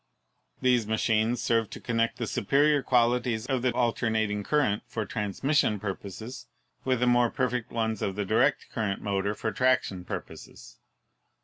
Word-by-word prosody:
These 125 -4 +3
machines 110 +2 +1
serve 115 -2 +1
to - - -8
connect 115 -1 -1
the 115 - -2
superior 140 +7 +2
qualities 120 -2 +1
of 130 -2 -1
the 125 0 +2
alternating 110 -4 0
current 125 -6 +1
for 110 -2 -3
transmission 105 +3 0
pui 95 -1 -3
poses 110 +6 -8 0.4
with 130 -2 0
the - - +4
more 120 -1 +4
perfect 125 -2 -1
ones 110 -2 -1
of 95 - -2
the 105 0 -2
direct 125 +7 +1
current 105 -4 -2
motor 100 0 -1
for 110 - -2
traction 110 -5 +1
purposes. - - -9
115 Hz, 150 wpm, -28 LUFS, 105-125 Hz, 0.4 s, the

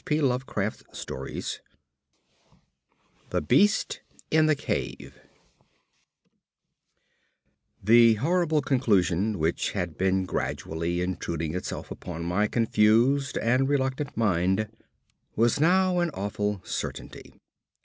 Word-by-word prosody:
P. 150 0 0
Lovecraft 125 -6 -1 2.5
The - - 0
Beast 205 - +2 0.3
in 155 0 +4
the 155 - +3
Cave - - -4 2.6
The 115 +2 +6
horrible 160 - +1
conclusion 105 -6 +1
which 80 +1 -1
had 90 -5 -4
been 95 0 +1
gradually 85 -1 -3
intruding 85 -3 -3
itself 90 - -5
upon 85 -1 -6
my 95 +5 +1
confused 115 +5 +2
and 125 +4 +1
reluctant 135 0 -1
mind 95 0 +1 0.7
was 115 +4 +2
now 180 +3 +3
an 175 -1 +1
awful 105 0 -2
certainty. - - -6
110 Hz, 90 wpm, -26 LUFS, 95-140 Hz, 2.6 s, The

